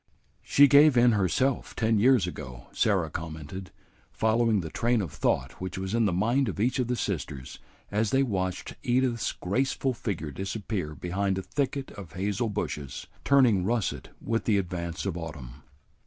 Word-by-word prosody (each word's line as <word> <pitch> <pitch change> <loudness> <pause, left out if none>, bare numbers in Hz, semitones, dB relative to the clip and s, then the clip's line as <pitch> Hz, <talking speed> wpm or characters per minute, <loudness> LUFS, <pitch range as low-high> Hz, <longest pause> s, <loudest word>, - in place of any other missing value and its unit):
"She 145 0 +6
gave 140 0 +6
in 120 0 +6
herself 110 +6 0
ten 110 -1 +2
years 125 -3 +5
ago," 65 -8 -7
Sarah - - +1
commented, 80 +3 -6 0.4
following 110 -2 +2
the 80 - -6
train 120 0 +1
of 90 -8 -3
thought 60 +4 -1
which 95 0 -4
was 95 +1 -3
in 115 -1 +3
the 100 - +2
mind 115 +8 +1
of 100 - -5
each 125 +5 +1
of 125 - +1
the 125 - 0
sisters 75 - -4 0.3
as 105 +1 +1
they 135 0 +3
watched 95 -6 -2
Edith's 125 -1 +1
graceful 130 +6 -1
figure 95 -10 -4
disappear 95 - -4
behind 95 +3 -1
a 95 - -3
thicket 135 +7 -2
of 95 -6 -10
hazel 100 +5 -1
bushes, 75 -9 -4 0.2
turning 125 -9 +4
russet 115 +1 -1
with 115 0 -2
the 105 -3 +3
advance 85 -2 -3
of 95 -4 -2
autumn. 75 -8 -7
100 Hz, 165 wpm, -28 LUFS, 90-120 Hz, 0.4 s, She